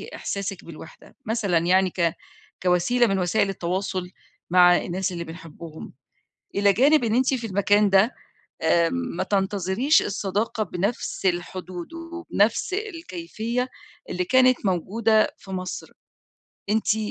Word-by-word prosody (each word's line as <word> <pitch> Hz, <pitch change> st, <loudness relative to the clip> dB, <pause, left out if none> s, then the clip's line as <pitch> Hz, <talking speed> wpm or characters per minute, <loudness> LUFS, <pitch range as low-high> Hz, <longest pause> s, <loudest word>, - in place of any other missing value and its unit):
إحساسِك 195 Hz, -1 st, -5 dB
بالوحدة، 160 Hz, -1 st, -13 dB
مثلًا 210 Hz, -6 st, +1 dB
يعني 185 Hz, +2 st, +3 dB
ك 170 Hz, -1 st, 0 dB, 0.5 s
كوسيلة 185 Hz, +7 st, +3 dB
من 195 Hz, -2 st, 0 dB
وسائل 190 Hz, +3 st, +1 dB
التواصل 185 Hz, 0 st, -3 dB, 0.4 s
مع 180 Hz, 0 st, +7 dB
الناس 185 Hz, +1 st, -2 dB
اللي 170 Hz, -1 st, -4 dB
بنحبِّهم، 165 Hz, -1 st, -10 dB, 0.6 s
إلى 200 Hz, 0 st, +4 dB
جانب 285 Hz, +6 st, +4 dB
إن 225 Hz, -1 st, +1 dB
أنتِ 260 Hz, +2 st, +2 dB
في 235 Hz, -3 st, -2 dB
المكان 205 Hz, +1 st, +3 dB
ده، 195 Hz, +5 st, +4 dB, 0.5 s
آمم، 165 Hz, +5 st, +3 dB, 0.2 s
ما -, -, 0 dB
تنتظريش 200 Hz, -, +2 dB
الصداقة 205 Hz, +2 st, -2 dB
بنفس 195 Hz, +3 st, -3 dB
الحدود، 180 Hz, -, -3 dB
وبنفس 335 Hz, -, -1 dB
الكيفية 250 Hz, -, -4 dB, 0.4 s
اللي 180 Hz, 0 st, -1 dB
كانت 255 Hz, 0 st, +4 dB
موجودة 215 Hz, +5 st, +2 dB
في 195 Hz, -, -14 dB
مصر، 185 Hz, -1 st, -5 dB, 0.8 s
أنتِ 220 Hz, 0 st, +2 dB
195 Hz, 120 wpm, -24 LUFS, 180-225 Hz, 0.8 s, مع